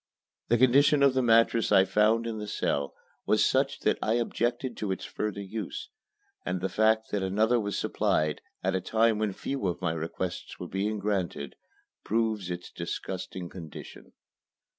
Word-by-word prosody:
The 120 - +3
condition 140 +4 +5
of 140 -2 +5
the 130 - +2
mattress 115 -1 +4
I 95 - +6
found 110 +3 +3
in 115 -2 -3
the 105 - -5
cell 70 -8 -1 0.3
was - - +4
such - - +1
that - - +1
I 110 - +1
objected 120 +1 -1
to 105 -3 -2
its 95 - -3
further 105 -1 -3
use, 100 0 -6 0.5
and 90 0 -2
the 95 +2 -2
fact 110 +1 +2
that 100 - 0
another 110 +5 +2
was 100 -3 -2
supplied, 75 -1 0 0.2
at 95 +1 +1
a 95 - 0
time 110 +2 +2
when 110 -2 0
few 130 +3 -3
of 85 -1 -2
my 90 -3 -1
requests 85 +2 -5
were - - -5
being 105 +3 -1
granted, 95 -9 -2 0.5
proves 110 -4 0
its 90 0 -6
disgusting 90 -2 -5
condition. 85 -3 -10
105 Hz, 165 wpm, -28 LUFS, 95-115 Hz, 0.5 s, I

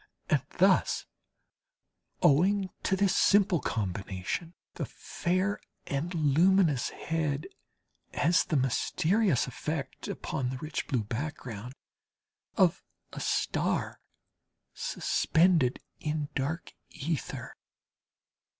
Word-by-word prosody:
And - - +4 0.2
thus, - - +3 1.2
owing 185 +5 +4
to 190 - +1
this 195 0 +2
simple 200 -3 +4
combination, 100 - -3 0.2
the - - -4
fair 185 +3 -1 0.3
and 145 +5 -2
luminous 160 -1 +3
head 155 -3 -2 0.7
has 165 +5 +4
the 155 - -2
mysterious 160 - +2
effect, 140 +2 -4
upon 125 -2 -3
the 130 - -4
rich 155 +3 -4
blue 125 -5 0
background, 125 -1 -5 0.8
of - - +4 0.3
a - - -5
star - - 0 0.7
suspended 165 -6 +2 0.2
in 150 -1 -2
dark 155 +5 -3 0.2
ether. 155 +2 -4
155 Hz, 90 wpm, -30 LUFS, 135-180 Hz, 1.2 s, And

